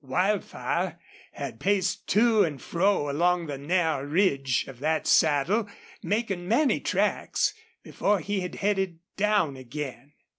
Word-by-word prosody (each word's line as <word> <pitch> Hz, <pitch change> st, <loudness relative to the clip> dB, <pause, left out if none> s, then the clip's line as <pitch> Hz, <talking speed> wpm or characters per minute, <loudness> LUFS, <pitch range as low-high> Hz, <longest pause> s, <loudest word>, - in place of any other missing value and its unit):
Wildfire 185 Hz, +9 st, -1 dB, 0.4 s
had 115 Hz, -, -6 dB
paced 190 Hz, -1 st, 0 dB
to 220 Hz, 0 st, +4 dB
and 150 Hz, -6 st, -2 dB
fro 180 Hz, +1 st, +1 dB
along 175 Hz, +3 st, +1 dB
the 145 Hz, -3 st, -5 dB
narrow 160 Hz, -2 st, 0 dB
ridge 140 Hz, -, +1 dB
of 130 Hz, -3 st, -11 dB
that 155 Hz, +3 st, 0 dB
saddle, 165 Hz, +9 st, +3 dB, 0.3 s
making 200 Hz, -4 st, -2 dB
many 265 Hz, +7 st, +3 dB
tracks, -, -, 0 dB, 0.3 s
before 205 Hz, -1 st, 0 dB
he 205 Hz, +3 st, -2 dB
had 180 Hz, -1 st, -5 dB
headed 195 Hz, -4 st, 0 dB, 0.2 s
down 205 Hz, -8 st, +1 dB
again. 135 Hz, +2 st, -7 dB
175 Hz, 125 wpm, -27 LUFS, 145-205 Hz, 0.4 s, to